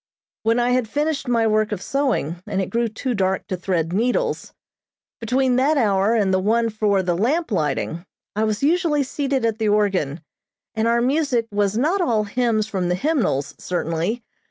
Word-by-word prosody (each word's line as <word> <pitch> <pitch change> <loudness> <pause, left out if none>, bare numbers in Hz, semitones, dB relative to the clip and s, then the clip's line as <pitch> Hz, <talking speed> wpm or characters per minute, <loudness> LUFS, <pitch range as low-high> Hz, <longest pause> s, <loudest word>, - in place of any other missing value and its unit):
When 225 +2 +2
I 245 +1 +2
had 250 -3 +1
finished 295 0 -1
my 230 -2 +2
work 215 0 +2
of 210 - -2
sewing, 215 - -1
and 190 - -2
it 190 - -2
grew 235 0 +1
too 245 +4 -3
dark 190 -2 0
to 185 - -3
thread 175 -2 -1
needles, 250 - 0 0.7
between 250 +2 +1
that 290 +4 +3
hour 205 -2 +2
and 200 -4 +2
the 185 - +3
one 225 +4 +1
for 210 -3 +1
the 175 -1 0
lamp 270 - 0
lighting, 160 -1 -1 0.3
I 215 +1 +1
was 215 +2 -2
usually 310 -2 +2
seated 270 -2 -1
at 225 -1 -1
the 220 -1 +1
organ, 190 -8 +1 0.5
and 220 0 0
our 235 0 +2
music 260 -2 +1
was 205 0 0
not 325 +10 +1
all 230 -10 +1
Hymns 220 0 0
from 190 -5 -2
the 180 - +1
Hymnals, 220 - 0
certainly. 175 +6 -2
220 Hz, 180 wpm, -22 LUFS, 195-255 Hz, 0.7 s, that